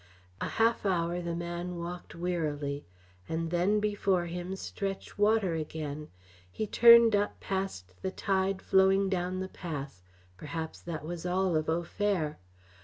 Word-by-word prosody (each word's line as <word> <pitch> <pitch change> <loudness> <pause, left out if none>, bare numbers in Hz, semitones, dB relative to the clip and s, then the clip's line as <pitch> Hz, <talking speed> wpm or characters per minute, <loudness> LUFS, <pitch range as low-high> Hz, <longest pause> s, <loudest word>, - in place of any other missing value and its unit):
A - - 0
half 230 +1 +3
hour 175 -2 0
the 170 -1 -3
man 175 +1 -4
walked 175 +1 -6
wearily, 150 - -2 0.4
and 165 0 -2
then 185 +5 +3
before 200 -4 +1
him 175 +2 -4
stretched 195 +1 -5
water 205 -3 +3
again. 155 -1 -4 0.4
He 215 - -2
turned 235 0 +8
up 205 0 0
past 190 - -3
the 190 - -1
tide 190 -1 0
flowing 190 +1 +4
down 185 0 -1
the 190 - -3
pass 145 - -6 0.4
perhaps 160 - -5
that 160 -3 -5
was 170 0 -5
all 185 -1 +1
of 155 0 0
Au 165 +2 +1
Fer. 175 - -1
175 Hz, 145 wpm, -30 LUFS, 165-195 Hz, 0.4 s, turned